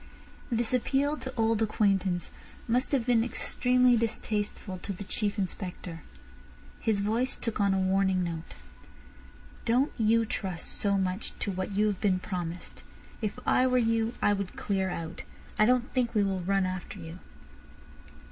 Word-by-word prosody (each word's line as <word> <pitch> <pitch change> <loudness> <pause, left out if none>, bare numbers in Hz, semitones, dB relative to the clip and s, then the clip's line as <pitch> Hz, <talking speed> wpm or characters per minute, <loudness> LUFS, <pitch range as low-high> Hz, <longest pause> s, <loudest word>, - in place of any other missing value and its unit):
This 235 +1 +1
appeal 275 +4 +2
to 260 -2 -7
old 225 -1 +2
acquaintance 195 -5 +1 0.4
must 245 +4 +1
have 265 -5 +2
been 240 -2 +4
extremely 250 +1 +3
distasteful 210 -4 -2
to 200 - -5
the 195 +1 -5
Chief 205 +2 -1
Inspector. 180 -3 -4 0.8
His 215 -3 +1
voice 230 +5 0
took 230 -3 -3
on 200 -1 +3
a - - +1
warning 190 0 +2
note. 165 -2 -5 1.1
"Don't 250 +5 +2
you 225 +1 +4
trust 190 -5 -3
so 200 -1 +1
much 190 +1 -2
to 200 - -2
what 185 +1 -3
you 210 +2 +3
have 205 -3 -1
been 195 -3 +3
promised. 180 -2 -5 0.4
If 215 0 -2
I 255 - +4
were 255 0 +3
you 230 -1 +1
I 205 - +5
would 200 -2 -3
clear 190 -2 0
out. 165 -1 -5 0.4
I 215 - +6
don't 250 -1 +2
think 245 -3 0
we 210 - +4
will 195 -1 0
run 195 +1 +2
after 185 -1 -4
you." 165 +2 -8
205 Hz, 155 wpm, -29 LUFS, 185-230 Hz, 1.1 s, I